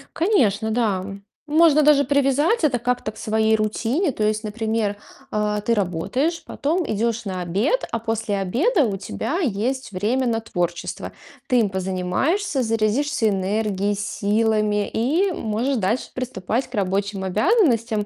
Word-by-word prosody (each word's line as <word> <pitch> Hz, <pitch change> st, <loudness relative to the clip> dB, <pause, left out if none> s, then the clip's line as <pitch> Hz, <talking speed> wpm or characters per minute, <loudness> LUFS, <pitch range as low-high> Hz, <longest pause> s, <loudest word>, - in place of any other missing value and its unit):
Конечно, 225 Hz, -, +2 dB
да. 210 Hz, -5 st, 0 dB, 0.4 s
Можно 305 Hz, 0 st, +5 dB
даже 290 Hz, -1 st, +5 dB
привязать 285 Hz, -, +2 dB
это 275 Hz, -5 st, +3 dB
как-то 245 Hz, -2 st, -2 dB
к 215 Hz, -, -18 dB
своей 220 Hz, 0 st, +2 dB
рутине. 230 Hz, -, 0 dB
То 220 Hz, -, -3 dB
есть, 215 Hz, +1 st, 0 dB
например, 220 Hz, -1 st, -2 dB, 0.3 s
а, 210 Hz, 0 st, 0 dB
ты 230 Hz, -, +1 dB
работаешь, 230 Hz, -, -1 dB
потом 330 Hz, +5 st, -1 dB
идешь 225 Hz, +1 st, -1 dB
на 185 Hz, -2 st, -3 dB
обед, 200 Hz, -, 0 dB
а -, -, 0 dB
после 225 Hz, -2 st, -2 dB
обеда 270 Hz, -, +2 dB
у 200 Hz, -3 st, -2 dB
тебя 195 Hz, -, -3 dB
есть 260 Hz, -, -1 dB
время 225 Hz, +7 st, 0 dB
на 225 Hz, -1 st, 0 dB
творчество. 175 Hz, -6 st, -3 dB, 0.4 s
Ты 250 Hz, -, +3 dB
им 205 Hz, -3 st, 0 dB
позанимаешься, 190 Hz, -, -1 dB
зарядишься 225 Hz, +3 st, +1 dB
энергией, 200 Hz, +1 st, 0 dB
силами 210 Hz, +1 st, 0 dB
и 320 Hz, -, +1 dB
можешь 240 Hz, -1 st, -1 dB
дальше 220 Hz, +5 st, -1 dB
приступать 250 Hz, -1 st, -3 dB
к -, -, -9 dB
рабочим 200 Hz, 0 st, -1 dB
обязанностям. 230 Hz, -, +2 dB
220 Hz, 140 wpm, -22 LUFS, 205-270 Hz, 0.4 s, Можно